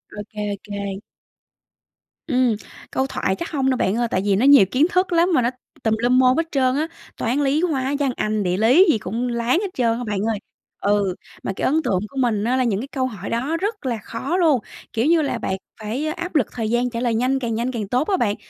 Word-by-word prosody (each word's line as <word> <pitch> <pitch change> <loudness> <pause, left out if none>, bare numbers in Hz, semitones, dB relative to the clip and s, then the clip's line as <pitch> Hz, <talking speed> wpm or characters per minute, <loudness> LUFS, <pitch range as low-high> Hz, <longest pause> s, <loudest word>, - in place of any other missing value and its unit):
Ô - - -7
kê, 210 -1 -4
ô - - -5
kê. 200 -1 -5 1.3
Ừm. 250 -5 +2 0.4
Câu 265 +1 0
thoại 190 - -1
chắc 340 - -5
hông 270 -3 +1
đâu, 260 - +1
bạn 190 +3 +1
ơi. 240 -1 +1
Tại 185 - +1
vì 200 -2 +3
nó 235 +7 +2
nhiều 280 -9 +8
kiến 280 +5 +4
thức 365 0 +1
lắm 340 +2 +4
mà 255 - +4
nó 235 - +2 0.3
tùm 220 -1 +2
lum 245 +2 +3
môn 255 +2 +4
hết 330 - +3
trơn 260 -2 +2
á. 310 +3 0 0.3
Toán, 245 +5 0
lý, 285 +4 +2
hóa, 280 -5 0
văn, 275 -3 +1
anh, 215 -1 -1
địa 180 0 0
lý 255 - +6
gì 225 - +2
cũng 225 +6 -3
láng 235 +6 +1
hết 405 - -1
trơn 230 -2 +1
á, 245 - -4
bạn 205 -2 -1
ơi. 210 - -2 0.4
Ừ, 200 -2 +1 0.3
mà - - -2
cái - - -2
ấn 315 +4 +2
tượng 185 - +1
của 275 - -12
mình 225 -5 +1
á, 245 +3 +1
là 255 - +2
những 210 -4 0
cái 270 - -6
câu 260 -2 -1
hỏi 205 -5 -7
đó 270 +8 -1
rất 410 -3 -3
là 240 -3 0
khó 275 +10 -3
luôn, 310 -8 +4 0.3
kiểu 230 +3 +1
như 330 0 +4
là, 275 -5 -1
bạn 190 -4 -2 0.2
phải 225 +8 -3
áp 345 +1 -4
lực 270 - +3
thời 225 -3 -3
gian 240 +1 +1
trả 230 -1 -4
lời 240 -2 0
nhanh, 255 +4 +1
càng 230 -3 -2
nhanh 240 +3 -1
càng 215 -5 -4
tốt 250 +8 0
á 385 -2 +2
bạn. 205 -7 +1
250 Hz, 255 wpm, -22 LUFS, 220-280 Hz, 1.3 s, nhiều